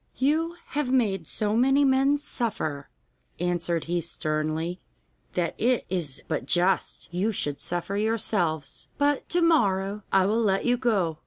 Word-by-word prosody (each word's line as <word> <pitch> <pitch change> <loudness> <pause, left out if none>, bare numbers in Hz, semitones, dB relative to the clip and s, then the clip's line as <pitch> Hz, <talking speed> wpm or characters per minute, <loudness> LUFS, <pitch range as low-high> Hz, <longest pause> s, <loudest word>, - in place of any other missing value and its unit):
'You 320 +5 +1
have 290 -3 -1
made 225 -7 +1
so 210 0 -1
many 270 +4 +4
men 270 +2 +3
suffer,' 210 - -3 0.5
answered 175 -1 0
he 175 +1 -1
sternly, 155 +2 -2 0.5
'that 175 -2 0
it 245 +2 +2
is 165 -8 -3
but 130 - -2
just 180 +4 +1
you 195 +5 +1
should 145 -8 -2
suffer 175 +3 -2
yourselves, 200 -8 -1
but 290 -1 +1
to 350 - +2
morrow 205 - +2
I 190 -1 +4
will 220 +4 +2
let 195 -3 +1
you 245 - +3
go. 200 -11 0
195 Hz, 145 wpm, -26 LUFS, 170-250 Hz, 0.5 s, many